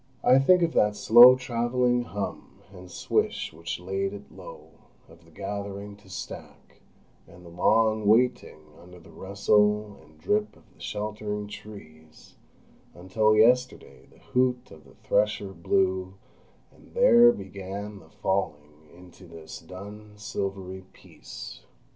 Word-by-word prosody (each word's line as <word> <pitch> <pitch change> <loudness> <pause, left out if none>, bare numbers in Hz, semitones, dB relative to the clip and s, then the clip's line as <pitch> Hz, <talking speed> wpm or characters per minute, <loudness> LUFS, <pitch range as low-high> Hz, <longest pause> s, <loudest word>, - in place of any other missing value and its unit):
I 130 +1 +6
think 180 +6 +4
of 165 - 0
that 105 0 +2
slow 120 +4 +8
travelling 125 0 0
hum 105 -3 -7
and 90 -1 -12
swish - - -2
which 85 +2 -6
laid 95 +2 -3
it 100 0 -11
low, - - -13 0.4
of 80 +1 -19
the - - -20
gathering 100 +3 -6
to 100 -2 -20
stack, 95 - -10 0.5
and 90 +1 -16
the - - -11
long 110 +3 +2
waiting 115 -7 +2 0.2
under 90 +1 -15
the 85 - -17
rustle 105 +1 +1
and 80 0 -22
drip 105 +5 -1
of - - -22
the - - -23
sheltering 105 0 -4
trees, 100 -7 -13 0.6
until 105 +5 +1
yesterday 125 +3 +1
the - - -22
hoot 125 0 -1
of 75 -3 -15
the 65 - -19
thresher 105 -1 0
blew, 95 +1 -1 0.6
and - - -21
there 240 - +7
began 100 - -8
the 80 -4 -19
falling 75 -6 -4
into 90 +1 -16
this 80 -1 -11
dun 100 +5 -11
silvery 95 -2 -5
peace. - - -11
100 Hz, 135 wpm, -26 LUFS, 90-110 Hz, 0.6 s, slow